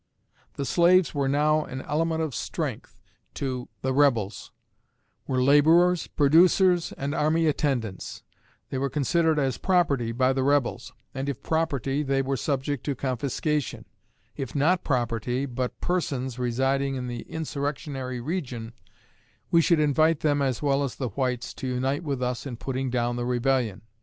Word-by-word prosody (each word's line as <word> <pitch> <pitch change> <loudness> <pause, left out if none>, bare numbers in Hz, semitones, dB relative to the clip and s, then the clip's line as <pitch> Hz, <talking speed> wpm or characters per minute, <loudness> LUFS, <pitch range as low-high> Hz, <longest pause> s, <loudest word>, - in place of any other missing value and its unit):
The 140 - -3
slaves 175 +3 +4
were 140 -2 0
now 150 +2 +2
an 130 -2 -7
element 160 +1 0
of 155 -4 -3
strength - - -4 0.4
to 130 -3 -4
the 130 0 0
Rebels 120 -8 +1 0.8
were 130 -1 +1
laborers, 160 +6 +5
producers, 175 +4 +4
and 140 +1 -3
army 160 +1 +2
attendants; 135 -10 -2 0.5
they 130 - -2
were 140 +1 0
considered 160 +3 +1
as 135 -3 0
property 145 -11 +1
by 130 +3 +2
the 135 - 0
Rebels, 135 -3 0 0.2
and 135 +1 -3
if 140 - -5
property 145 -4 0
they 135 -1 0
were 135 +1 -1
subject 140 0 -2
to 140 - -1
confiscation; 140 +3 -2 0.5
if 135 -1 -5
not 165 +6 +2
property, 120 0 -1
but 125 -1 -4
persons 130 -8 -2
residing 135 +3 0
in 125 -1 -4
the 120 -1 -5
insurrectionary 140 -4 -4
region, 125 -6 -4 0.8
we 170 - +6
should 165 0 +3
invite 155 +1 +3
them 145 -2 +2
as 135 -1 -1
well 140 -1 +2
as 135 - -3
the 130 -3 -3
whites 125 +1 -2
to 130 - -6
unite 130 +4 -1
with 140 -5 -2
us 125 +2 -2
in 120 -3 -6
putting 130 +1 -3
down 120 -1 -1
the 120 - -2
Rebellion." 125 -4 0
135 Hz, 150 wpm, -26 LUFS, 125-150 Hz, 0.8 s, we